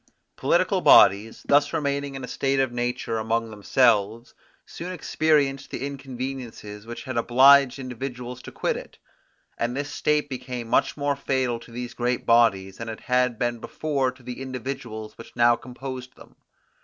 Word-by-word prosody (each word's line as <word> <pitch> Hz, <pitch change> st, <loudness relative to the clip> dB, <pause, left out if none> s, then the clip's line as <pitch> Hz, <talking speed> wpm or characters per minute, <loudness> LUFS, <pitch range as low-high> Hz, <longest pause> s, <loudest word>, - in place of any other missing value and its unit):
Political -, -, +2 dB
bodies, 105 Hz, +4 st, +5 dB
thus 145 Hz, +2 st, +3 dB
remaining 140 Hz, -2 st, -2 dB
in 135 Hz, -, -6 dB
a -, -, -5 dB
state 135 Hz, +2 st, 0 dB
of 135 Hz, -2 st, +1 dB
nature 120 Hz, -1 st, -2 dB
among 115 Hz, +1 st, -1 dB
themselves, 110 Hz, +1 st, +1 dB, 0.3 s
soon 180 Hz, +2 st, -7 dB
experienced 150 Hz, -5 st, +1 dB
the -, -, -4 dB
inconveniences 130 Hz, -6 st, -7 dB
which 120 Hz, -, -7 dB
had 130 Hz, -4 st, -5 dB
obliged 130 Hz, +3 st, +6 dB
individuals 125 Hz, -1 st, -6 dB
to -, -, -10 dB
quit -, -, -1 dB
it; -, -, -9 dB, 0.6 s
and 120 Hz, +2 st, -1 dB
this 145 Hz, 0 st, -3 dB
state 150 Hz, -1 st, +1 dB
became 125 Hz, -3 st, -6 dB
much 115 Hz, -, +1 dB
more 145 Hz, 0 st, 0 dB
fatal 130 Hz, -3 st, -1 dB
to 115 Hz, 0 st, -15 dB
these 120 Hz, +1 st, -6 dB
great 125 Hz, 0 st, -1 dB
bodies, 100 Hz, -5 st, +3 dB
than 115 Hz, 0 st, -6 dB
it 110 Hz, -, -7 dB
had 125 Hz, -1 st, +1 dB
been 120 Hz, 0 st, -1 dB
before 140 Hz, 0 st, -1 dB
to 125 Hz, -, -20 dB
the 125 Hz, +1 st, -7 dB
individuals 125 Hz, -4 st, -6 dB
which 115 Hz, -, -12 dB
now 120 Hz, 0 st, +5 dB
composed 130 Hz, +1 st, -8 dB
them. -, -, -17 dB
125 Hz, 160 wpm, -25 LUFS, 115-135 Hz, 0.6 s, obliged